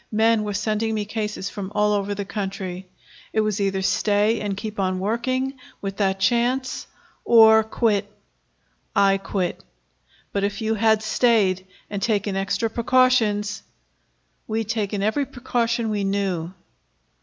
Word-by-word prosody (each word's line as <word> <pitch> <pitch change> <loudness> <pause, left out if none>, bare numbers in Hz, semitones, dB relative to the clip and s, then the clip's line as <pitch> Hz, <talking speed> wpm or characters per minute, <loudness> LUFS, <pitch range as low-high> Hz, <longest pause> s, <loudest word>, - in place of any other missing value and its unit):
Men 225 +1 +3
were 205 -1 -3
sending 220 +2 -1
me 210 -1 -2
cases 210 -2 -4
from 200 -2 -6
all 210 0 +3
over 205 0 -1
the 200 0 -4
country. 190 -2 -5 0.5
It 220 - +3
was 215 -1 -1
either 195 -1 0
stay 210 +3 +2
and 200 -2 -3
keep 215 0 -6
on 185 -1 0
working, 255 +7 -1 0.2
with 195 -1 -5
that 195 -2 +1
chance, 245 +6 0 0.4
or 220 -1 +7
quit. 210 -2 0 0.8
I 195 -1 +4
quit." 190 -2 -3 0.7
"But 200 - 0
if 200 0 -1
you 220 0 0
had 220 0 +2
stayed, 205 -5 +2 0.2
and 200 -1 -5
taken 205 -2 0
extra 195 +4 0
precautions 225 -3 +2 0.4
" - - -45
"We'd 220 -1 -2
taken 205 -3 -1
every 265 +7 0
precaution 235 -2 -1
we 205 -1 -1
knew." 195 -4 -1
210 Hz, 145 wpm, -23 LUFS, 195-225 Hz, 0.8 s, or